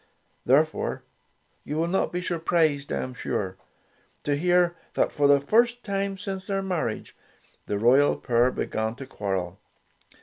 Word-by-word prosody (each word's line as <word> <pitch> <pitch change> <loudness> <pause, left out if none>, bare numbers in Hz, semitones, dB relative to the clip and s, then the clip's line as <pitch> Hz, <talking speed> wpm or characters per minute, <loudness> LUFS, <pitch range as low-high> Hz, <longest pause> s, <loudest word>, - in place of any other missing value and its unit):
Therefore, 155 +5 +2 0.6
you 150 - -4
will 165 +1 +1
not 190 +3 0
be 180 +1 -3
surprised, 165 -5 +1
I - - -1
am 130 - -6
sure, 95 -6 -3 0.7
to 145 - +1
hear 175 +2 +2 0.2
that, - - +2
for 145 -1 +2
the 140 0 +6
first 235 - +2
time 195 -1 -2
since 195 -1 -5
their 195 -1 -1
marriage, 175 - -3 0.5
the 105 - -1
royal 130 +7 +4
pair 120 0 +2
began 110 -2 -2
to 135 +1 -8
quarrel. 95 -5 -3
150 Hz, 145 wpm, -26 LUFS, 125-185 Hz, 0.7 s, the